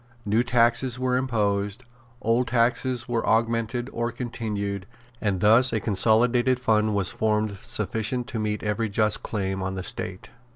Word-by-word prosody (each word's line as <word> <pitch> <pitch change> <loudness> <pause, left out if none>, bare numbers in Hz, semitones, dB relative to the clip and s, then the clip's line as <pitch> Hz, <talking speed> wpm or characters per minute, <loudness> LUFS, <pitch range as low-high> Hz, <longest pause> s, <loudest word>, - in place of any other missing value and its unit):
New 110 +3 +2
taxes 120 +1 +2
were 130 0 0
imposed; 105 -3 -1 0.4
old 120 +2 +2
taxes 125 +1 +1
were 120 -2 -1
augmented 115 +2 0
or 120 0 -2
continued; 105 -5 -4 0.3
and 100 -4 -1
thus 115 +4 +6
a 115 - 0
consolidated 120 +5 +2
fund 110 -3 +1
was 95 -2 +1
formed 105 -2 -1
sufficient 115 +4 -1
to 115 - -5
meet 105 0 -2
every 105 +1 -1
just 105 +1 +1
claim 95 -3 -3
on 95 0 -3
the 95 - -4
State. 95 +1 -4
110 Hz, 150 wpm, -25 LUFS, 105-120 Hz, 0.4 s, thus